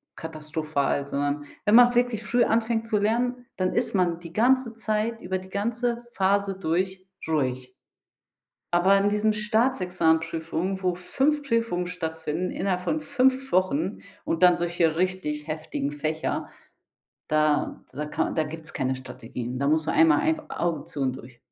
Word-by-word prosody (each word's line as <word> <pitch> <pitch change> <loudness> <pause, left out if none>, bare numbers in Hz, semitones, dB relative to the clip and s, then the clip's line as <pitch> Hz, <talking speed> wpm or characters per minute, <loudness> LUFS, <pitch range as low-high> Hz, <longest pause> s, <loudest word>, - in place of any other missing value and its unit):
katastrophal, 155 -3 -2
sondern 145 +1 -1 0.2
wenn 210 +1 +5
man 245 0 +7
wirklich 245 -3 +1
früh 240 +2 +2
anfängt 225 0 +1
zu 220 -2 +1
lernen, 245 +4 0
dann 185 -1 0
ist 235 -3 0
man 175 -2 +1
die 170 -1 -11
ganze 245 +2 +3
Zeit, 220 +1 -1
über 185 +1 -2
die 185 - -13
ganze 235 +4 -1
Phase 195 0 +1
durch, 185 +2 -1 0.2
ruhig. 130 -5 -1 1.0
Aber 185 +3 +5
in 200 +1 +3
diesen 210 +1 +2
Staatsexamensprüfungen, 185 -5 0
wo 180 -1 +1
5 280 +11 0
Prüfungen 230 -9 0
stattfinden, 160 0 -3
innerhalb 185 -1 -1
von 305 +12 0
5 265 -2 +1
Wochen, 185 0 +1 0.3
und 165 +2 0
dann 180 -1 +7
solche 170 -2 +1
richtig 170 -5 -1
heftigen 155 -2 -3
Fächer, 155 +2 -2 0.8
da 155 -1 +1
da 150 +3 -4
ka - - -1
da 160 - +1
gibt's 160 +1 -7
keine 130 -2 -1
Strategien. 125 -1 -6
Da 140 - +2
muss 155 +1 +2
man - - 0
einmal 160 -2 +5
einf 315 -1 +1
„Augen 170 -4 -2
zu 145 - -7
und 130 -1 0
durch“. 125 -2 -13
180 Hz, 155 wpm, -26 LUFS, 155-220 Hz, 1.0 s, man